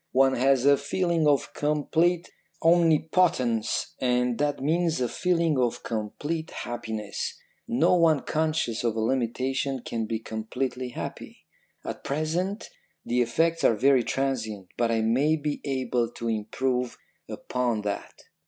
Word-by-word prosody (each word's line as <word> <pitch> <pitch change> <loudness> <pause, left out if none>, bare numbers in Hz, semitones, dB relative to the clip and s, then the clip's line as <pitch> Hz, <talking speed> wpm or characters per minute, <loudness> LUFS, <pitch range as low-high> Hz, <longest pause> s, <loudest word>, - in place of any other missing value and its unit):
One 135 0 +5
has 130 0 +3
a 140 0 +6
feeling 165 +2 0
of 145 -2 +2
complete 160 +4 +1 0.3
omnipotence, 160 -8 +2
and 125 -1 +1
that 145 -1 0
means 165 +2 +1
a 125 - +1
feeling 170 -2 +1
of 120 -2 0
complete 145 +9 -3
happiness. 110 -3 -5 0.3
No 150 +10 +3
one 160 -4 +4
conscious 155 -7 -1
of 115 -2 0
a - - -1
limitation 130 +2 -1
can 115 -1 -3
be 115 - -1
completely 125 +4 -4
happy. 120 - -8 0.4
At - - -6
present 170 +8 -2 0.3
the 125 +1 +1
effects 165 +8 +1
are 115 - +5
very 130 +2 +4
transient, 110 -8 -2
but 120 -1 +1
I 115 -1 +1
may 130 +8 +3
be 150 -1 -3
able 130 -4 0
to 115 - -5
improve 125 +3 -1 0.3
upon 120 -4 -2
that.' 100 -1 -5
130 Hz, 135 wpm, -26 LUFS, 115-155 Hz, 0.4 s, a